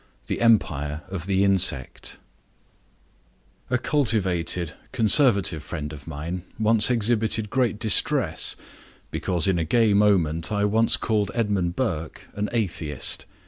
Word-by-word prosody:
THE -, -, -4 dB
EMPIRE 80 Hz, -10 st, +1 dB
OF 95 Hz, -2 st, -6 dB
THE 95 Hz, 0 st, +1 dB
INSECT 95 Hz, -9 st, -1 dB, 1.5 s
A 125 Hz, -, +1 dB
cultivated 95 Hz, -, -1 dB, 0.2 s
Conservative 110 Hz, -, +3 dB
friend 75 Hz, -3 st, -6 dB
of 75 Hz, 0 st, -12 dB
mine 80 Hz, +4 st, -5 dB, 0.2 s
once 110 Hz, 0 st, +3 dB
exhibited 110 Hz, -2 st, +1 dB
great 125 Hz, -5 st, 0 dB
distress 110 Hz, -2 st, +2 dB, 0.6 s
because 90 Hz, -3 st, -1 dB
in 95 Hz, -3 st, +1 dB
a -, -, 0 dB
gay 110 Hz, +5 st, +2 dB
moment 90 Hz, -6 st, +2 dB
I 105 Hz, -1 st, +1 dB
once 110 Hz, +2 st, +3 dB
called 105 Hz, -4 st, -1 dB
Edmund 100 Hz, -7 st, -1 dB
Burke 85 Hz, -11 st, -4 dB
an 105 Hz, 0 st, -3 dB
atheist. 90 Hz, -10 st, -2 dB
100 Hz, 120 wpm, -24 LUFS, 85-110 Hz, 1.5 s, Conservative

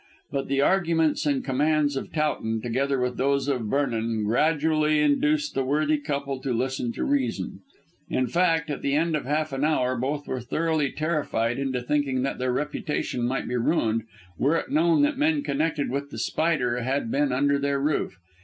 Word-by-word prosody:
But 135 Hz, -1 st, -2 dB
the 140 Hz, 0 st, +1 dB
arguments 165 Hz, -3 st, +2 dB
and 140 Hz, -2 st, 0 dB
commands 145 Hz, +1 st, +1 dB
of 135 Hz, -, -4 dB
Towton, 145 Hz, -8 st, -1 dB
together 135 Hz, +3 st, 0 dB
with 125 Hz, 0 st, -1 dB
those 140 Hz, +1 st, +1 dB
of 125 Hz, -6 st, -1 dB
Vernon, 115 Hz, -4 st, 0 dB
gradually 155 Hz, +5 st, +2 dB
induced 295 Hz, -, +2 dB
the 135 Hz, -, 0 dB
worthy 150 Hz, +3 st, +1 dB
couple 140 Hz, -2 st, -3 dB
to 135 Hz, -, -2 dB
listen 125 Hz, 0 st, -1 dB
to -, -, -3 dB
reason. 280 Hz, -1 st, -1 dB, 0.5 s
In 130 Hz, -, +1 dB
fact, 165 Hz, +2 st, +1 dB
at 145 Hz, -, -4 dB
the 140 Hz, 0 st, 0 dB
end 165 Hz, +1 st, +1 dB
of 150 Hz, -, -3 dB
half 150 Hz, +1 st, -1 dB
an 135 Hz, +1 st, -2 dB
hour 130 Hz, -5 st, +2 dB
both 140 Hz, +4 st, -2 dB
were 130 Hz, -, -2 dB
thoroughly 155 Hz, +3 st, 0 dB
terrified 140 Hz, -7 st, -1 dB
into 130 Hz, -2 st, -2 dB
thinking 135 Hz, -1 st, 0 dB
that 135 Hz, -, -2 dB
their 130 Hz, 0 st, 0 dB
reputation 150 Hz, -3 st, -2 dB
might 130 Hz, +2 st, -2 dB
be 125 Hz, -, -1 dB
ruined 115 Hz, -4 st, +1 dB, 0.3 s
were 150 Hz, +5 st, +3 dB
it -, -, -4 dB
known 315 Hz, 0 st, +3 dB
that 295 Hz, -2 st, +1 dB
men 305 Hz, -1 st, +2 dB
connected 150 Hz, -, -1 dB
with 140 Hz, +1 st, -3 dB
The -, -, -8 dB
Spider 145 Hz, -7 st, 0 dB
had 130 Hz, -1 st, -1 dB
been 145 Hz, -1 st, +1 dB
under 140 Hz, +2 st, +2 dB
their 140 Hz, 0 st, 0 dB
roof. 140 Hz, -9 st, -1 dB
140 Hz, 180 wpm, -25 LUFS, 130-155 Hz, 0.5 s, were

